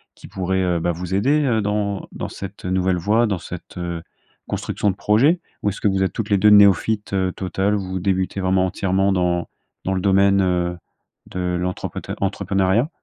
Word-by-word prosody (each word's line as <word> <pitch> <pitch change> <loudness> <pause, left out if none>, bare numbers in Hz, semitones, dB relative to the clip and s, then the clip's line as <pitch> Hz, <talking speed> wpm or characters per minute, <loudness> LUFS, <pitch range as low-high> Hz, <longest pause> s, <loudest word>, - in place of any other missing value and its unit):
qui - - -13
pourrait, 95 0 -1
heu, 90 -2 +1
bah, 85 +1 0
vous 90 +2 -5
aider, 140 +10 +2
heu, 115 -5 +2
dans 100 -1 -2
dans - - -5
cette, - - -9
heu, - - -2
nouvelle 95 -1 +1
voie 110 +7 +2
dans 100 -3 -1
cette, - - -9
heu, 85 -1 -4 0.5
construction 105 - -1
de 95 - -1
projet? 130 - +3 0.2
Ou 105 - +1
est-ce 100 - -6
que - - +2
vous 95 -1 +1
êtes 95 - 0
toutes 110 -2 -4
les 100 - +5
2 105 +3 +6
néophytes, 105 +1 +4
heu, 95 -1 +1
totales, 95 +2 -1
vous 95 -2 -3
débutez 95 +1 -1
vraiment 95 0 +2
entièrement 95 +1 +1
dans 90 -2 0 0.4
dans 95 - 0
le 95 - -1
domaine, 100 0 +4
heu, 90 -1 0 0.5
de 90 -1 -2
l'entreprète 90 +1 -4
entrepreneuriat? 100 - +1
95 Hz, 195 wpm, -21 LUFS, 90-100 Hz, 0.5 s, 2